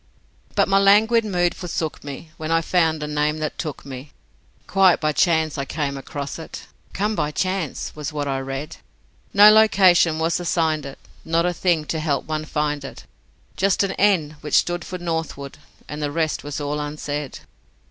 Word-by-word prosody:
But - - +3
my 195 0 +4
languid 215 +4 +5
mood 175 -4 +1
forsook 165 -3 -4
me, 145 +3 -8
when 155 0 -5
I 165 0 +3
found 160 -3 +1
a - - -3
name 150 +1 0
that 155 -1 -4
took 155 -4 -5
me, 135 +1 -9 0.5
Quite 190 -2 +4
by 155 -1 +1
chance 160 -2 +1
I 140 - -2
came 140 -1 -3
across 140 +2 -6
it 160 - -8 0.3
'Come 210 +2 -1
by 150 - 0
Chance' 185 0 -3
was 150 0 -5
what 145 -1 -3
I 135 -1 -1
read; 135 +3 -5 0.5
No 205 +1 +8
location 190 -7 +5
was 165 +2 0
assigned 160 -4 0
it, 135 - -10 0.3
not 165 +1 +1
a 180 - +1
thing 170 -3 +1
to 160 - -2
help 145 -4 -1
one 155 0 -3
find 150 -2 -2
it, 140 - -9 0.5
Just 195 +1 +2
an 195 - -1
N 170 -8 +1
which 150 -2 -1
stood 175 -1 +2
for 185 - -6
northward, 160 -5 -4 0.3
and 150 +1 -6
the 145 -1 -2
rest 160 0 -1
was 145 0 -5
all 145 0 -2
unsaid. 145 -1 -5
155 Hz, 180 wpm, -22 LUFS, 150-175 Hz, 0.5 s, No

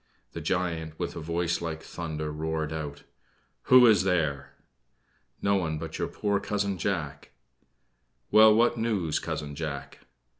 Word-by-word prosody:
The - - -5
giant, 80 -4 -2
with 85 - -4
a - - -5
voice 85 +2 -1
like 80 -1 -4
thunder, 80 -3 -5
roared 80 0 -3
out: 75 -2 -6 0.6
"Who 130 -1 +8
is 110 -3 +6
there?" 80 -7 0 0.9
"No 100 0 +3
one 80 -4 -1
but 80 0 -6
your - - 0
poor 100 -1 -1
Cousin 100 -2 -2
Jack." 80 -7 -3 1.0
"Well, 110 0 +8
what 115 +2 +3
news, 100 -9 0
Cousin 75 -2 -4
Jack?" 70 -2 -6
85 Hz, 140 wpm, -28 LUFS, 80-100 Hz, 1.0 s, Who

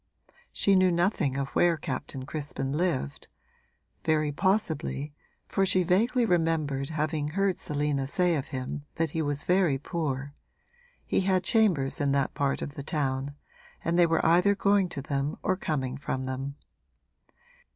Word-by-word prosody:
She 200 - +3
knew 185 -1 +4
nothing 170 -6 +1
of 140 0 -2
where 175 -2 +3
Captain 135 -1 -5
Crispin 145 -2 -4
lived; 150 - -1 0.8
very 155 -2 +1
possibly 160 -5 -1 0.3
for 195 - +1
she 185 -1 +4
vaguely 225 +8 +2
remembered 160 -7 0
having 155 -1 -1
heard 195 +4 0
Selina 145 -2 -1
say 180 +4 +2
of 140 -4 -2
him 130 +1 -5
that 165 -2 0
he 160 - -1
was 145 -2 0
very 180 -6 +3
poor 145 -2 -3 0.7
he - - +1
had 185 -1 +1
chambers 175 - +2
in 140 -1 +2
that 140 -1 +1
part 140 -1 -1
of 140 - -6
the 140 - -6
town, 140 -2 -1 0.5
and 170 +1 +2
they 175 - +6
were 165 - +1
either 180 +5 +4
going 200 -2 +2
to 140 - -5
them 140 0 -2
or 185 - +2
coming 135 -8 -2
from 130 -1 -3
them. 130 +2 -4
155 Hz, 150 wpm, -28 LUFS, 140-180 Hz, 0.8 s, they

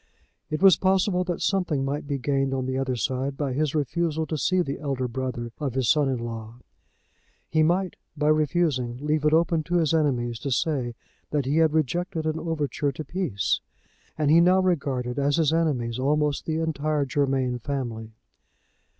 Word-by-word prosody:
It 155 +4 -2
was 195 -3 +8
possible 190 -1 +2
that 175 -2 -3
something 175 -9 0
might 145 +1 -3
be 140 -1 -1
gained 135 0 0
on 130 -1 -2
the 130 0 -2
other 130 -1 -1
side 130 +5 -2
by 140 -3 -1
his 150 +2 0
refusal 160 +2 0
to 155 - -3
see 180 +5 +2
the 140 -3 -4
elder 135 -3 -2
brother 120 -1 -4
of 140 -5 -3
his 130 -3 +1
son 150 -3 +3
in 130 - 0
law. 115 -1 -6 0.9
He 155 - +2
might, 175 +3 +1 0.2
by 150 +1 +2
refusing, 150 -6 +1
leave 150 +2 -1
it 150 - +4
open 165 0 +3
to 175 - -1
his 165 -2 +2
enemies 120 -7 0
to 140 - -4
say 125 -2 0 0.3
that 145 -3 0
he 140 +4 +1
had 160 -2 +4
rejected 160 +2 -1
an 160 0 -1
overture 150 -3 -1
to 150 +3 -7
peace, 165 - -1 0.6
and 150 -1 +2
he 165 +2 +7
now 180 +2 +5
regarded 140 -8 0
as 140 0 +2
his 160 -2 +2
enemies 130 -8 0
almost 150 +1 +1
the 160 -1 0
entire 155 -2 0
Germain 130 -3 0
family. 115 -5 -4
145 Hz, 180 wpm, -25 LUFS, 130-160 Hz, 0.9 s, was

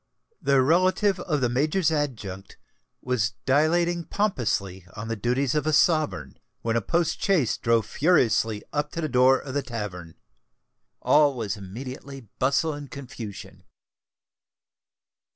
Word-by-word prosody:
The 135 -2 +3
relative 185 +6 +2
of 150 -5 -1
the 125 - +3
mayor's 155 +7 +1
adjunct 110 -11 -4 0.5
was 125 -4 0
dilating 170 +5 +2
pompously 100 - -1
on 105 +2 -6
the 115 - -1
duties 125 +5 0
of 150 0 0
a 155 - +1
sovereign, 145 - +1 0.2
when 115 0 0
a 115 - +2
post 170 - 0
chaise 170 - +2
drove 115 -1 +1
furiously 115 - +2
up 150 0 -1
to 165 - -3
the 155 - -1
door 130 -1 +4
of 130 0 -8
the 145 - 0
tavern. 105 -10 -6 0.9
All 145 -2 +4
was 110 -4 -3
immediately 130 +7 -8 0.2
bustle 140 +4 +1
and 145 -2 -8
confusion. 120 -6 -9
130 Hz, 135 wpm, -25 LUFS, 115-155 Hz, 0.9 s, door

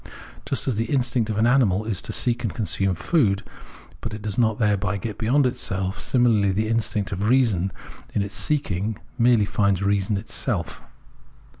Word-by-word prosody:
Just - - -1
as 125 -5 0
the 115 - 0
instinct 120 -3 0
of 105 - -2
an 110 - +3
animal 115 -6 +3
is 110 -4 -1
to - - -5
seek 120 0 +1
and 110 - -1
consume 95 -3 0
food, 105 - +1 0.6
but 105 -1 -5
does 105 -2 -4
not 110 -3 +2
thereby 100 -3 0
get 105 +1 -6
beyond 130 +5 +2
itself; 95 -6 -2
similarly 115 -6 +2
the 110 +3 -1
instinct 110 -3 -1
of 100 +3 -1
reason 110 -8 +2 0.4
in 100 - +2
its 100 0 -7
seek 150 -7 0
ing 100 +4 -2 0.2
merely 120 -3 +4
finds 100 -2 +1
reason 100 0 +1
itself. 90 -6 -3
105 Hz, 170 wpm, -23 LUFS, 100-115 Hz, 0.6 s, merely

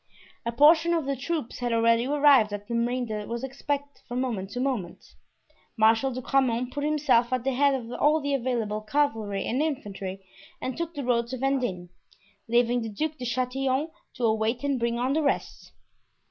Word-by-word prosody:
A - - +1
portion 320 +6 +5
of 320 -4 -1
the 275 0 -1
troops 275 0 -4
had 245 -1 -1
already 230 +1 +3
arrived 280 -6 +5
and 205 0 -5
the 235 - -4
remainder 235 -3 -1
was 235 +1 -4
expected 285 +1 -4
from 245 +1 -3
moment 220 -7 -2
to 245 - -5
moment. 245 -10 -3 0.6
Marshal 225 +4 +4
de 255 +1 -5
Grammont 255 -1 +1
put 285 - -3
himself 285 -6 +2
at 255 -2 0
the 270 +1 0
head 280 +1 +3
of 240 -3 -6
all 305 +2 +4
the 285 -1 -2
available 235 -5 -1
cavalry 215 -5 -1
and 255 +5 0
infantry 195 -10 -4 0.3
and 260 - -4
took 335 0 -4
the 285 - -4
road 235 -1 +1
to 260 +2 -5
Vendin, 245 -10 -1 0.6
leaving 240 +1 +2
the 225 - -4
Duc 305 +9 -3
de 250 - -4
Chatillon 260 +4 -1 0.2
to 245 - -5
await 220 +3 0
and 280 -2 0
bring 235 0 0
on 255 +3 0
the 315 - +1
rest. 285 - -2
250 Hz, 185 wpm, -26 LUFS, 230-280 Hz, 0.6 s, portion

